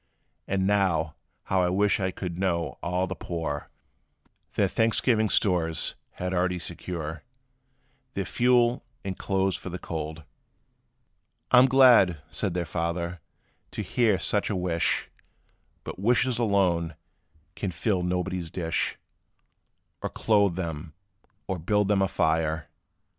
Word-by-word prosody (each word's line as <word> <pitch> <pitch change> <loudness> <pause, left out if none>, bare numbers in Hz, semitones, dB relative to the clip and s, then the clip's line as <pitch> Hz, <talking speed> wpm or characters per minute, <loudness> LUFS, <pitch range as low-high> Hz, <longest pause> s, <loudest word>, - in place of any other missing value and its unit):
And 95 -1 0
now 95 -6 +2 0.3
how 95 -1 +1
I 90 - +2
wish 100 +3 +2
I 95 -1 0
could 90 -2 -5
know 85 -4 -1
all 90 +1 0
the 95 - -4
poor 80 -5 -4 0.9
Their - - +3
Thanksgiving 110 -1 +2
stores 85 -5 +1 0.2
had 90 +1 -3
already 90 0 +1
secure, 85 -2 -5 0.9
Their - - -1
fuel, 120 0 +3 0.2
and 95 -1 -3
clothes 95 -1 0
for - - -6
the 90 - -5
cold!" 80 -2 -5 1.3
"I 125 - +8
'm 130 - +7
glad," 125 - +6
said 95 -4 -2
their 90 -1 -1
father, 85 +1 -3 0.5
"to - - -4
hear 115 -5 +2
such 105 +2 0
a 105 - -1
wish; 90 -2 0 0.7
But - - -7
wishes 120 +3 +2
alone, 90 -7 +1 0.6
can 100 - -3
fill 90 +2 0
nobody's 90 -1 -2
dish, 85 0 -1 1.0
Or - - -2
clothe 100 -5 +2
them, 80 -3 -5 0.5
or 95 -3 -3
build 105 +4 +1
them 100 -2 +3
a 95 - +3
fire. 80 -1 0
90 Hz, 130 wpm, -27 LUFS, 85-100 Hz, 1.3 s, I